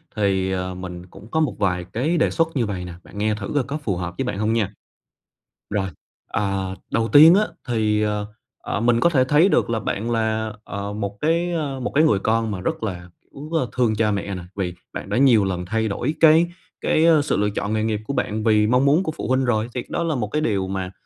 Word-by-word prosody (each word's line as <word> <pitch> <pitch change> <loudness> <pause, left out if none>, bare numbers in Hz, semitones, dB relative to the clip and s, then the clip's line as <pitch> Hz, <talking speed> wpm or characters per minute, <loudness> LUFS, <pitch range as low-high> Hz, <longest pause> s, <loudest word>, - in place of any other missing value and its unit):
thì, 95 -3 +1
ờ, 95 0 -2
mình 90 -1 -7
cũng 95 +3 -14
có 160 - +1
một 155 -5 0
vài 90 -3 0
cái 150 +10 0
đề - - +3
xuất 165 -1 +1
như 125 -4 +1
vầy 95 -4 -4
nè, 90 - -7
bạn - - -13
nghe 105 +1 +1
thử 105 -2 -6
coi 145 - +3
có 140 +4 -4
phù 120 -11 -2
hợp 90 0 -4
với - - -1
bạn 110 - -3
hông 110 +1 +1
nha. 105 -3 0 1.0
Rồi, 100 -2 -1 0.4
ờ, 95 -2 -1 0.2
đầu 115 0 +1
tiên 155 +7 +8
á 210 - +4 0.2
thì, 110 -3 +1
ờ, 105 -1 -1 0.3
ờ, - - -3
mình 120 0 +3
có 170 - +4
thể 135 -6 +3
thấy 150 +8 +4
được - - +2
là 115 -1 0
bạn 110 +2 -3
là, 110 -1 -1
ờ, 100 0 -5
một 100 -1 -4
cái, 170 +3 +1
ơ, 145 -5 -2
một 125 - -3
cái 155 - +5
người 150 -11 +3
con 110 +2 0
mà 95 - -4
rất 95 - -3
là, 90 -4 -5 0.2
cũng 145 +3 -9
rất 160 -5 +1
thương 120 -4 +2
cha 105 0 +1
mẹ 100 -1 -3
nè, 90 - -6
vì 95 -3 -2 0.2
bạn - - -6
đã 105 - 0
nhiều 120 -6 +5
lần 90 -2 -2
thay 110 +4 -1
đổi 120 +8 -2
cái 160 +1 +6 0.3
cái, 155 - +2
ơ, 160 -3 +5
sự 145 - 0
lựa 105 0 +1
chọn 105 +1 -3
nghề 110 0 0
nghiệp 110 -1 0
của - - -2
bạn 110 -4 -2
vì 105 -1 +3
mong 125 +4 +3
muốn 150 +6 +4
của 160 - -2
phụ - - -6
huynh 130 +1 +2
rồi, 110 -3 +1
thì 125 - -2
cái - - -16
đó - - -1
là 165 -2 0
một 115 -5 -1
cái 150 +9 -1
điều 100 -9 0
mà 95 -1 -4
110 Hz, 255 wpm, -22 LUFS, 100-135 Hz, 1.0 s, tiên